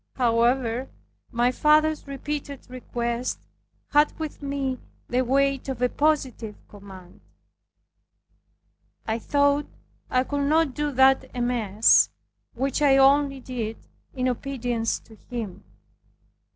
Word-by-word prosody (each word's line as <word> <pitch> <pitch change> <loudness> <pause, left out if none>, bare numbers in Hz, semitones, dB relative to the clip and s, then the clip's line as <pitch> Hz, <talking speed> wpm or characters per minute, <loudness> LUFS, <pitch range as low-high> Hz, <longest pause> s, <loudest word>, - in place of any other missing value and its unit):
However, 240 +1 +1 0.4
my 240 0 +2
father's 305 +2 +2
repeated 280 0 -5
requests 240 -1 -3 0.5
had 295 +1 +4
with 315 -2 -6
me 275 -2 -2 0.3
the 250 +1 +1
weight 275 +1 +1
of 260 -3 -4
a 250 0 +2
positive 260 -8 0
command. 195 -1 -13 1.8
I 220 +1 -1
thought 285 +3 +2 0.4
I 255 0 +2
could 285 +1 -2
not 315 -3 +2
do 295 +1 -2
that 265 +1 +4
amiss, 230 -4 +3 0.5
which 270 +3 -1
I 275 -2 +5
only 275 0 +4
did 230 -4 -4 0.4
in 255 -1 0
obedience 245 -3 -2
to 220 - -18
him. 215 -6 -5
255 Hz, 110 wpm, -25 LUFS, 235-280 Hz, 1.8 s, I